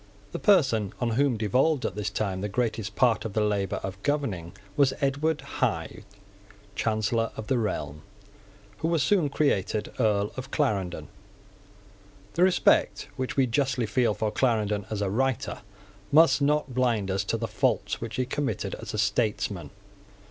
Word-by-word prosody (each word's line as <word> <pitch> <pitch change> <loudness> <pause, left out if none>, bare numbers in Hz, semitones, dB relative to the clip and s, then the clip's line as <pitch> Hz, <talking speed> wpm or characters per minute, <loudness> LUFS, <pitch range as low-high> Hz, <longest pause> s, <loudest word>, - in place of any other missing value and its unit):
The - - -4
person 135 - +3
on 120 -2 0
whom 130 0 +2
devolved 130 +7 +2
at - - -1
this 105 +1 -2
time 100 -2 -2
the 105 - -2
greatest 110 -2 -2
part 120 -4 +3
of 110 - -5
the 110 - +1
labour 100 -2 0
of 95 0 -6
governing 110 - -2 0.2
was 135 -2 +3
Edward 145 +2 0
Hyde, - - -2 0.7
Chancellor 110 +1 0
of 110 - -5
the 125 +2 +1
realm, 75 -9 -3 0.8
who 160 - -1
was 165 -4 +2
soon 170 -2 +2
created 110 -8 0
Earl 105 -3 +2
of 130 +1 -6
Clarendon. 100 - -1 1.3
The 170 - -1
respect 185 0 +3
which 130 +1 -4
we 135 - +5
justly 125 -1 0
feel 110 0 +1
for 105 0 -1
Clarendon 105 -5 0
as 105 -2 -2
a 100 - 0
writer 130 +2 -1 0.5
must 145 -2 +6
not 145 -2 +1
blind 115 -6 +1
us 95 +1 0
to 115 - -1
the 115 0 -3
faults - - 0
which 115 -1 -5
he 130 - 0
committed 140 +2 -2
as - - -6
a - - -3
statesman. 105 -2 0
115 Hz, 160 wpm, -27 LUFS, 105-135 Hz, 1.3 s, must